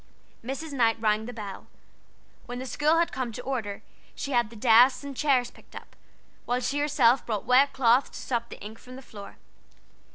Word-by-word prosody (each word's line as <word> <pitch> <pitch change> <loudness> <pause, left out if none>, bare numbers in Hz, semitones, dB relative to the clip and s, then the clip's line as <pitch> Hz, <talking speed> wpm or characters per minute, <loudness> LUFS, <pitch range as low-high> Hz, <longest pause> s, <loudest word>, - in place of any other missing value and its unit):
Mrs. 275 +5 -5
Knight 230 -4 +2
rang 215 0 0
the - - -5
bell. 210 -5 -8 0.8
When 245 - -6
the 255 - -5
school 300 +5 +1
had 335 0 +1
come 255 -3 -3
to 245 - -7
order, 225 -7 -4 0.3
she 280 - -5
had 240 -4 +2
the 230 - -14
desks 245 +4 +5
and 280 -1 -7
chairs 260 -4 +1
picked - - -20
up, - - -11 0.5
while 245 +1 0
she 275 +3 -2
herself 270 -4 +3
brought 215 -4 -3
wet 270 +3 +4
cloths 250 0 +3
to - - -10
sop 235 -2 -3
the - - -10
ink 215 +2 -9
from 255 0 -12
the 265 - -11
floor. 205 -5 -11
245 Hz, 195 wpm, -27 LUFS, 225-270 Hz, 0.8 s, desks